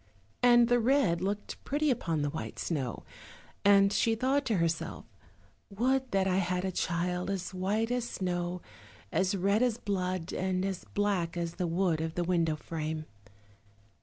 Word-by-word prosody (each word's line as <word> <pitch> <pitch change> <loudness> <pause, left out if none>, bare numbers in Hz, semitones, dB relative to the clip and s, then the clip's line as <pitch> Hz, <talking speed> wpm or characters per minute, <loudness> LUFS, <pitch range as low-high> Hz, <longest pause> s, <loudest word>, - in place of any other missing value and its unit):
And 240 -1 +6
the 245 0 +3
red 230 -9 +2
looked 200 +2 -3
pretty 295 +1 +1
upon 165 - -1
the 145 - -1
white 160 - -6
snow, 135 - -3 0.6
and 200 0 +6
she 225 +1 +2
thought 265 +4 +1
to 225 - +2
herself, 165 -1 -1 0.6
"Would 255 +5 +1
that 195 -3 +1
I 185 -1 +2
had 180 0 0
a 190 - -1
child 180 +1 -1
as 190 -1 -3
white 205 +5 0
as 245 -1 -1
snow, 175 -1 -2 0.5
as 190 +1 +1
red 200 +4 +2
as 245 -3 +2
blood, 185 -5 -2
and 185 0 -1
as 190 -2 -4
black 195 -5 0
as 170 -1 -2
the 180 - 0
wood 170 -1 +1
of 160 0 -3
the 175 - 0
window 170 -3 +1
frame." 155 0 -4
185 Hz, 165 wpm, -30 LUFS, 170-215 Hz, 0.6 s, And